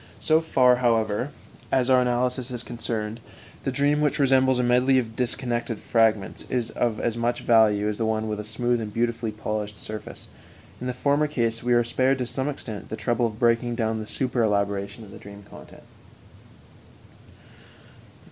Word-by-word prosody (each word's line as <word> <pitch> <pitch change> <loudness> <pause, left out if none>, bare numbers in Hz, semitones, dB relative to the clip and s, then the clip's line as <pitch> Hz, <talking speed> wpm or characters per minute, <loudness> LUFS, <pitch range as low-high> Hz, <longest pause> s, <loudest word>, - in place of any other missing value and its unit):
So 160 0 +3
far, 125 -6 +4
however, 115 0 +1 0.4
as 130 -2 +2
our 130 -1 +5
analysis 125 +1 0
is 120 -2 -5
concerned, 115 -2 -4 0.4
the 135 - -1
dream, 145 +3 +1
which 150 -1 +1
resembles 130 -2 +3
a 125 - +1
medley 125 +2 +3
of 115 -3 -1
disconnected 120 -2 -2
fragments, 110 -4 +1
is 120 -3 -1
of 115 -3 -1
as 120 -1 -1
much 120 +1 -1
value 105 -3 +4
as 105 -1 -3
the 115 - +1
one 110 0 -1
with 105 -1 -3
a - - -4
smooth 120 +2 -1
and 105 -1 -5
beautifully 115 0 -1
polished 105 -1 -4
surface. 110 -1 -8 0.5
In 125 - -3
the 125 - -1
former 145 +3 +2
case 115 -5 -1
we 120 0 +1
are 120 0 +4
spared, 130 +3 +1
to 125 - -2
some 130 +4 -2
extent, 110 -7 -7
the 110 - -5
trouble 120 -1 +1
of 110 -1 -8
breaking 120 0 +2
down 110 -2 -1
the 110 - -6
super 125 0 -1
elaboration 100 0 -1
of 100 - -13
the - - -11
dream 100 0 -12
content. - - -14
120 Hz, 175 wpm, -25 LUFS, 110-125 Hz, 0.5 s, our